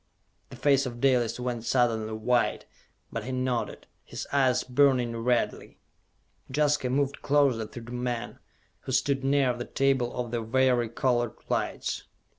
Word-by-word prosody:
The - - -10
face 135 +1 +3
of 120 -1 -7
Dalis 125 -3 +2
went 125 -2 -3
suddenly 115 -3 +1
white, 120 +3 0 0.5
but - - -4
he 130 - -4
nodded, 130 -2 -2 0.2
his - - -7
eyes 130 -3 +3
burning 125 -3 +2
redly. 120 +1 -1 0.7
Jaska 145 -2 +1
moved 140 +2 0
closer 135 -6 +2
to 120 - -9
the 115 +1 -10
men, 120 -1 -3 0.4
who 130 - -6
stood 135 +1 +1
near 135 -2 +3
the 120 0 -5
table 135 -3 +1
of 120 -2 -3
the 120 -1 -1
vari 120 0 +2
colored 120 -1 0
lights. - - -2
125 Hz, 145 wpm, -27 LUFS, 120-135 Hz, 0.7 s, face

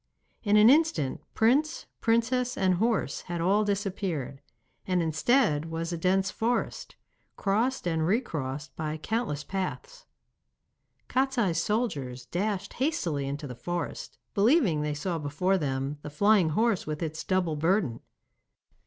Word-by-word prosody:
In 210 -1 +3
an 210 +1 +7
instant 265 - +3
prince, 280 +8 +2
princess, 245 +2 +1
and 185 -1 +3
horse 220 +4 0
had 175 -1 -5
all 195 +5 +3
disappeared, 190 - -2 0.5
and 185 -1 +2
instead 160 - +2
was 165 +1 -4
a - - 0
dense 190 +3 +1
forest, 235 +2 -2 0.4
crossed 225 +3 0
and 160 -2 +1
recrossed 150 - -2
by 155 0 -3
countless 185 -5 -2
paths. 465 - -5 1.0
Kostiei's 245 -10 +1
soldiers 145 - -2
dashed 190 - -2
hastily 170 - -1
into 145 +2 -4
the 130 - -6
forest, 175 +7 -5 0.2
believing 205 - +3
they 150 0 -1
saw 170 +2 -2
before 180 +7 0
them 135 0 -2
the 150 - -7
flying 200 +2 +4
horse 220 +3 +1
with 155 +1 -3
its 160 0 -4
double 180 -4 0
burden. 165 - +1
185 Hz, 130 wpm, -28 LUFS, 150-225 Hz, 1.0 s, an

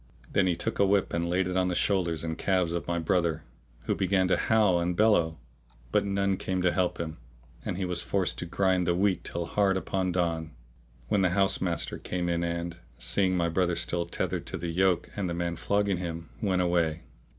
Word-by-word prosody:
Then 95 - +3
he 90 - +2
took 85 - -3
a 100 - +5
whip 100 0 +2
and 85 0 0
laid 90 +2 +1
it 90 0 -3
on 95 -1 +2
the 90 - -1
shoulders 85 -6 +1
and 80 -1 -2
calves 90 -3 +1
of 85 - -3
my 85 0 0
brother, 85 -1 0 0.4
who - - -1
began 95 0 +2
to - - +4
howl 105 -6 +3
and 85 0 -1
bellow; 85 -7 +3 0.5
but - - +2
none 100 -1 +1
came 95 -1 -2
to 90 - +4
help 90 0 0
him; 80 -5 -5 0.4
and - - -3
he 95 - -1
was 90 -1 0
forced 95 0 -1
to 90 - -4
grind 95 0 +1
the 85 - +2
wheat 95 0 +1
till 85 0 -3
hard 95 +2 +2
upon 95 -1 -1
dawn, 85 -3 -1 0.5
when 100 - +2
the 90 - +3
house 95 0 +3
master 90 -2 -2
came 90 -1 -2
in 85 0 0
and, 85 0 -3 0.2
seeing 95 -2 +1
my 85 -1 +2
brother 90 +1 +1
still 85 0 -1
tethered - - -3
to - - -4
the 85 +1 -4
yoke 95 +1 +2
and 95 -3 -2
the 85 - -2
man 85 0 -2
flogging 100 +2 0
him, 85 -2 -5
went 95 -3 +1
away. 85 -2 +1
90 Hz, 215 wpm, -28 LUFS, 85-95 Hz, 0.5 s, a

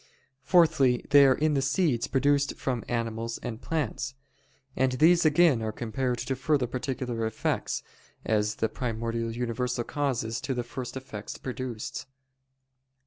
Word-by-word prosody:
_ - - -28 0.4
Fourthly, 155 -6 +4
they 140 -1 +8
are 130 - +5
in 155 +2 +1
the 140 - +2
seeds 135 -3 +1
produced 140 +1 +2
from 125 -4 -2
animals 115 -1 -2
and 120 0 -5
plants. 140 -4 -2 0.6
And 130 0 +2
these 165 +5 +5
again 155 -5 +5
are 110 -1 -2
compared 120 +3 -2
to 135 - -2
further 135 0 +1
particular 125 -1 -3
effects, 110 - -2 0.4
as 105 -1 +1
the 110 - 0
primordial 115 -1 -3
universal 120 +1 -2
causes 120 -5 -2
to 135 - -2
the 120 - -1
first 125 +2 -6
effects 120 -6 -7
produced. 125 -3 -5
125 Hz, 140 wpm, -28 LUFS, 115-140 Hz, 0.6 s, they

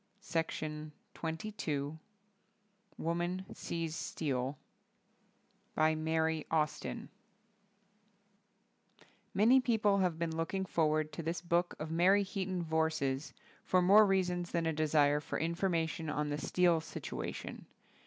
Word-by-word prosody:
Weaver. 155 -2 -2 0.3
Alfred 160 +5 -3 0.2
A. 155 - -1
Knopf. 140 +2 -4 1.0
WOMAN 175 +3 -2
SEES 165 -2 -4
STEEL 135 -4 -2 1.2
By 155 0 +4
Mary 160 0 0
Austin 155 -1 -1 2.3
MANY 230 +6 +6
people 215 -5 +2
have 180 -4 +1
been 165 -1 -2
looking 175 +4 -1
forward 155 -3 +1
to - - -4
this 165 +2 -2
book 175 0 +1
of 155 +1 -5
Mary 185 +5 +4
Heaton 190 -2 -3
Vorse's 160 -4 -1 0.3
for 185 -1 +3
more 205 +3 +7
reasons 180 -2 +1
than 170 -1 -1
a 160 - +1
desire 150 -1 +3
for 150 - -4
information 165 -1 -1
on 150 0 -1
the 145 0 -2
steel 175 0 +3
situation. - - -6
165 Hz, 115 wpm, -33 LUFS, 155-180 Hz, 2.3 s, more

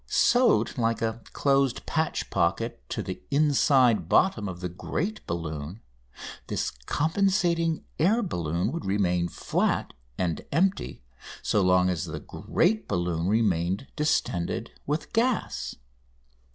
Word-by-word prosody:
Sewed 240 - +3
like 115 -1 +1
a 115 +1 -2
closed 135 -3 +1
patch 160 0 -1
pocket 115 +8 0
to - - -3
the 95 - -6
inside 135 - +3
bottom 110 - +3
of 90 -1 -7
the 90 - -3
great 165 - -4
balloon, 80 +2 -4 0.7
this - - -1 0.2
compensating 170 -1 +1
air 215 +9 +3
balloon 85 - -1
would 170 +2 -4
remain 90 -3 +1
flat - - -1 0.2
and 85 -4 -1
empty 185 - 0 0.4
so 105 - +2
long 90 0 +4
as 90 -4 -1
the - - -5
great 215 +6 0
balloon 85 -1 -1
remained 100 0 +1
distended 100 - -1 0.2
with 150 +2 0
its - - -19
gas. 235 +1 0
115 Hz, 125 wpm, -27 LUFS, -, 0.7 s, long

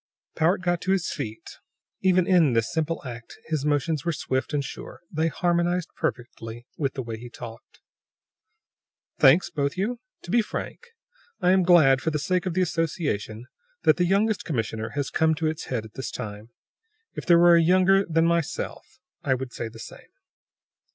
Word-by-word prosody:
Powart 170 +4 +2
got 175 -1 0
to 190 - +1
his 185 -4 -1
feet. 110 -6 -7 0.4
Even 185 -1 +3
in 170 -8 +4
this 115 -1 0
simple 160 0 -1
act 120 -2 -9
his 155 -3 -2
motions 150 0 0
were 170 - 0
swift 130 -3 -2
and 145 -2 0
sure; - - -9
they 160 0 +1
harmonized 175 +1 0
perfectly 120 -1 -5
with 140 -3 -2
the 130 - -3
way 115 -1 -6
he 120 +1 -9
talked. 115 -1 -11 1.4
"Thanks, 145 +8 +5
both 140 +3 -2
you. 230 +6 -1 0.2
To 175 - -7
be 235 - +4
frank, 480 - -6 0.5
I 180 - +3
am 190 0 +4
glad, 160 -7 +5
for 160 - 0
the 155 - -1
sake 180 +5 -1
of 175 - -3
the 185 - +3
association, 145 - -2 0.4
that - - +5
the 180 - +2
youngest 200 +3 +1
commissioner 110 -6 -3
has 140 -2 -2
come 160 0 +2
to 160 +1 -3
its 155 0 -2
head 115 -4 -3
at 110 - -13
this 130 -6 -5
time. 105 -2 -7 0.6
If - - -7
there 170 -1 +7
were 175 0 +7
a 170 - +5
younger 185 +3 +4
than 165 -2 +1
myself, 170 -2 -2 0.2
I 130 - +1
would 130 -1 -6
say 115 - -4
the 115 0 -12
same." 115 - -11
160 Hz, 180 wpm, -25 LUFS, 125-175 Hz, 1.4 s, there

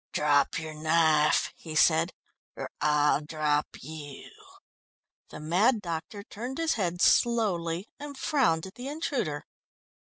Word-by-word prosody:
"Drop 145 -1 +2
your 160 -1 -5
knife," 155 -1 +2
he 160 -2 -9
said, 160 +2 +4 0.4
"or - - -6
I'll 150 0 +3
drop 150 -1 0 0.2
you." 150 -3 -9 1.0
The - - -9
mad 190 +10 +2
doctor 175 +2 -5
turned 240 +5 -7
his 330 -1 +1
head 175 -4 -1
slowly 195 -6 +2
and 285 -1 -8
frowned 245 - +1
at 190 - -10
the 250 +1 -8
intruder. 275 - -3
165 Hz, 125 wpm, -28 LUFS, 155-225 Hz, 1.0 s, said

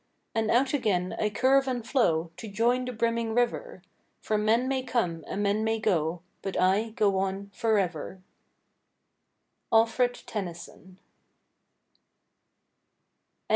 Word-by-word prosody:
And 225 -1 0
out 260 +4 +3
again 190 -9 0
I 210 - +1
curve 270 +5 +3
and 245 -3 -3
flow 170 - +1
To 225 - -7
join 235 +5 +1
the 250 - -3
brimming 230 -1 -1
river; 240 -6 -1 0.4
For 215 - -2
men 220 +4 +2
may 265 -1 0
come 220 -11 -1
and 205 - -2
men 205 +2 +1
may 225 0 0
go, 175 -5 0 0.2
But 195 - -3
I 195 +5 +2
go 205 -3 +1
on 195 +1 -3
forever. 190 -5 -1 1.5
—Alfred 230 +2 +3
Tennyson. 180 -1 -7
215 Hz, 120 wpm, -28 LUFS, 190-235 Hz, 1.5 s, out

